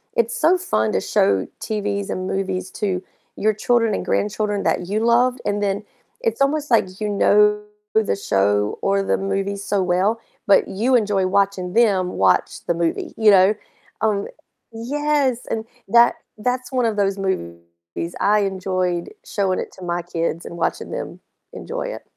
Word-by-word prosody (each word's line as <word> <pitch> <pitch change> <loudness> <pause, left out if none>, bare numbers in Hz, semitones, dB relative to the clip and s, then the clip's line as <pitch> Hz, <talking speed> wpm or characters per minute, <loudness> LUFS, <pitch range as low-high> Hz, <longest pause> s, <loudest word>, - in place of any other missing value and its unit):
it's 235 0 +1
so 340 +4 +4
fun 110 - 0
to - - +1
show 95 -1 +2
TVs 205 -2 -2
and 185 0 -3
movies 190 -1 -2
to 185 -3 0 0.3
your 215 +1 +1
children 230 +1 +1
and - - -4
grandchildren 205 0 -1
that 175 - 0
you 205 +3 0
loved, 245 +2 +3
and 205 0 0
then 200 +1 -1 0.4
it's 460 - -1
almost 295 +2 +1
like 190 -5 +2
you 210 - 0
know 210 +1 +4 0.3
the 220 -1 +2
show 105 - +1
or 195 0 +2
the - - +1
movie 195 +1 -2
so 200 0 -1
well, 185 +5 +1 0.3
but 200 - +5
you 235 +7 +1
enjoy 205 -5 +2
watching 195 -2 0
them 200 -5 +3
watch 95 - +1
the - - +2
movie, 170 0 -2
you 220 -1 +5
know? 190 +1 +6 0.5
Um, 210 -2 +1 0.5
yes, 275 +2 0
and 220 -1 -2 0.2
that 235 +3 +5 0.2
that's 250 +3 -2
one 255 -2 +1
of 225 -2 0
those 200 -1 +1
movies 85 - -5
I 210 +1 +3
enjoyed 185 -2 -1 0.2
showing 195 -2 0
it - - -5
to 185 - -12
my 175 0 -1
kids 170 -1 -3
and 170 - -8
watching 165 - -2
them - - -5 0.3
enjoy - - -5
it. - - -14
200 Hz, 165 wpm, -21 LUFS, 185-225 Hz, 0.5 s, know